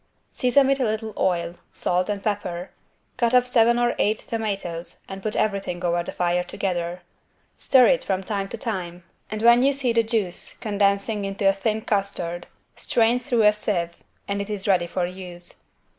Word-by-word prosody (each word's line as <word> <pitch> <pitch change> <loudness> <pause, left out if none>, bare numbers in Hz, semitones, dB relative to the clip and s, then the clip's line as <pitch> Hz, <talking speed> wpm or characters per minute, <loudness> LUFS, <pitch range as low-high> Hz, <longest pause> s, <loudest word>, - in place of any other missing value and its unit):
Season 265 +2 +3
with 275 +1 +2
a - - +2
little 220 -1 -2
oil, 170 -2 0 0.2
salt 180 +2 0
and 200 -1 -2
pepper, 185 -4 -3 0.5
cut 240 0 +2
up 250 0 +5
seven 235 -1 +4
or 240 0 +2
eight 210 +1 +2
tomatoes 195 -8 -4
and 195 0 -7
put 215 +1 -2
everything 195 -4 -1
over 175 0 +1
the - - -6
fire 175 0 0
together. 175 -2 -3 0.5
Stir 260 -2 +5
it 260 +1 +3
from 190 -1 -1
time 195 -1 -2
to - - -5
time 180 -6 -4 0.3
and 215 +1 -4
when 235 +1 +7
you 275 +2 +4
see 265 -4 0
the 230 - +4
juice 220 -6 -2
condensing 205 0 0
into 195 0 -1
a 195 - +6
thin 215 +3 -1
custard 180 -4 -2 0.3
strain 235 +1 +2
through 240 -3 +1
a 210 0 +6
sieve, 175 -5 -2 0.3
and 200 0 -1
it 200 - -6
is 205 -2 -3
ready 180 -3 +3
for 175 +1 -1
use. 180 -1 -8
200 Hz, 180 wpm, -24 LUFS, 180-225 Hz, 0.5 s, when